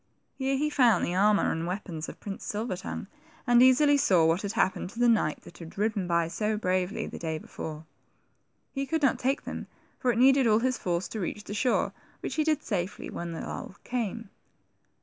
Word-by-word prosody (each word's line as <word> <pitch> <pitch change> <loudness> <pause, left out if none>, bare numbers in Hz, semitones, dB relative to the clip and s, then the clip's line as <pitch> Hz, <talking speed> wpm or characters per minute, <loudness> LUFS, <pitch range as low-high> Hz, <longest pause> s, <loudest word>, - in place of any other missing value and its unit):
Here 270 0 -1
he 300 +2 0
found 240 -9 +4
the 175 - -2
armor 205 +2 +3
and 165 +1 -2
weapons 175 -4 -4
of - - -10
Prince 195 -2 -7
Silver 215 -1 -3
tongue, 180 - -6 0.4
and 240 0 +5
easily 285 +3 +6
saw 185 - +4
what 165 +4 +2
had 200 0 -3
happened 185 -1 0
to 215 - -14
the 245 - +4
knight 215 -10 +2
that - - -14
had 165 +1 -10
ridden 205 -3 0
by 170 -1 +2
so 210 +5 -1
bravely, 185 -1 -1
the - - -7
day 160 -1 -2
before. 155 0 -7 0.9
He 275 0 -3
could 320 0 -1
not 270 - +3
take 270 +3 0
them, - - -6 0.3
for 250 - +2
it 230 - -2
needed 265 +1 +5
all 215 -1 +5
his 255 +1 0
force 175 0 -1
to 220 - -5
reach 205 +2 -4
the 205 - -7
shore, 245 +4 +1 0.3
which - - -4
he 310 - +1
did 310 -1 +1
safely, 190 -3 -3
when 170 0 -5
the 165 - -5
lull - - -6
came. 230 -3 -3
210 Hz, 210 wpm, -28 LUFS, 180-255 Hz, 0.9 s, easily